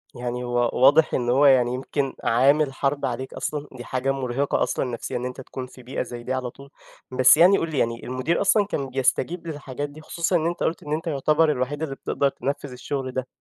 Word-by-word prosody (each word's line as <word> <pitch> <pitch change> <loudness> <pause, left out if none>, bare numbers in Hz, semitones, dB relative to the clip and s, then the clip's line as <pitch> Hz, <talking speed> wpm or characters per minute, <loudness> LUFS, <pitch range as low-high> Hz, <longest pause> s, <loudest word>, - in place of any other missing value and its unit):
يعني 125 0 -4
هو 120 -1 +1
واضح، 145 +5 +5
إن 120 -1 0
هو 135 +4 +4
يعني 125 -3 +5
يمكن 135 +1 -2
عامل 135 +4 +3
حرب 140 +1 -1
عليك 130 +1 -4
أصلًا، 150 -1 -4
دي 125 -2 -9
حاجة 130 +2 -1
مرهقة 135 +1 0
أصلًا - - -1
نفسيًا 120 -1 -4
إن 125 - -4
أنتَ 125 +1 -6
تكون 130 0 -7
في 130 0 -15
بيئة 125 +2 -4
زي 120 -1 -8
دي 125 - -2
على 130 -1 -2
طول، 140 +3 -14 0.4
بس 130 +3 +6
يعني 185 +4 +7
قُل 165 - -2
لي 150 - -3
يعني 115 0 -1
المدير 130 +7 -1
أصلًا 200 +1 +4
كان 140 -9 -3
بيستجيب 135 +6 0
للحاجات 145 -2 -5
دي؟ 150 +2 -12
خصوصًا 170 +3 -1
إن 160 -2 +2
أنتَ 175 0 -3
قُلت 165 - -1
إن 150 0 -4
أنتَ 160 +2 -3
يعتبر 155 +1 +2
الوحيد 145 +3 -2
اللي 140 -4 -3
بتقدر 140 +1 0
تنفذ 140 +1 -4
الشغل 130 +1 -4
ده. 130 0 -3
135 Hz, 220 wpm, -24 LUFS, 125-150 Hz, 0.4 s, يعني